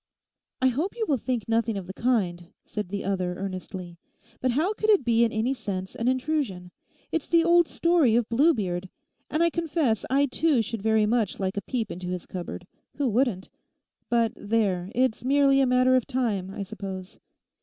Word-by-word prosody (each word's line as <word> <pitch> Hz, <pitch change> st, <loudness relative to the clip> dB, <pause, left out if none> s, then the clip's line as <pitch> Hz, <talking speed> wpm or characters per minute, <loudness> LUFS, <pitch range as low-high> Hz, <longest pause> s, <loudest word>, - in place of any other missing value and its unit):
'I 260 Hz, -, +6 dB
hope 305 Hz, +11 st, -2 dB
you 450 Hz, -, 0 dB
will 280 Hz, -5 st, +1 dB
think 240 Hz, -3 st, -2 dB
nothing 225 Hz, -1 st, +1 dB
of 190 Hz, -, -5 dB
the 190 Hz, -, -7 dB
kind,' 190 Hz, -8 st, 0 dB, 0.2 s
said 210 Hz, -4 st, -5 dB
the 200 Hz, +1 st, -3 dB
other 185 Hz, -2 st, -1 dB
earnestly; 185 Hz, -2 st, -6 dB, 0.4 s
'how 290 Hz, -, +1 dB
could 430 Hz, 0 st, -2 dB
it 400 Hz, -, +4 dB
be 235 Hz, -1 st, +4 dB
in 230 Hz, -, +2 dB
any 225 Hz, +4 st, 0 dB
sense 190 Hz, -6 st, -5 dB
an 230 Hz, -, -3 dB
intrusion? 255 Hz, -, -1 dB, 0.4 s
It's 325 Hz, -, -1 dB
the 335 Hz, -1 st, +4 dB
old 340 Hz, 0 st, +5 dB
story 335 Hz, -9 st, +3 dB
of 235 Hz, -2 st, +2 dB
Bluebeard. 215 Hz, -, +1 dB, 0.4 s
And 315 Hz, +2 st, +1 dB
I 335 Hz, -, +3 dB
confess 315 Hz, -, 0 dB
I 275 Hz, +2 st, +3 dB
too 280 Hz, -2 st, +2 dB
should 225 Hz, 0 st, -5 dB
very 220 Hz, 0 st, +3 dB
much 220 Hz, -3 st, 0 dB
like 190 Hz, -1 st, -2 dB
a 200 Hz, -, -2 dB
peep 230 Hz, -1 st, -3 dB
into 180 Hz, +1 st, -6 dB
his 180 Hz, -1 st, -4 dB
cupboard. 180 Hz, -1 st, -6 dB, 0.3 s
Who 285 Hz, -2 st, 0 dB
wouldn't? 225 Hz, -5 st, 0 dB, 0.6 s
But 235 Hz, -2 st, +2 dB
there, 200 Hz, -4 st, 0 dB
it's 250 Hz, -2 st, +1 dB
merely 275 Hz, +1 st, +4 dB
a 265 Hz, -, +3 dB
matter 255 Hz, +1 st, +4 dB
of 255 Hz, -, +1 dB
time, 225 Hz, -8 st, -1 dB
I 200 Hz, +1 st, -5 dB
suppose. 190 Hz, -2 st, -7 dB
230 Hz, 185 wpm, -26 LUFS, 195-270 Hz, 0.6 s, I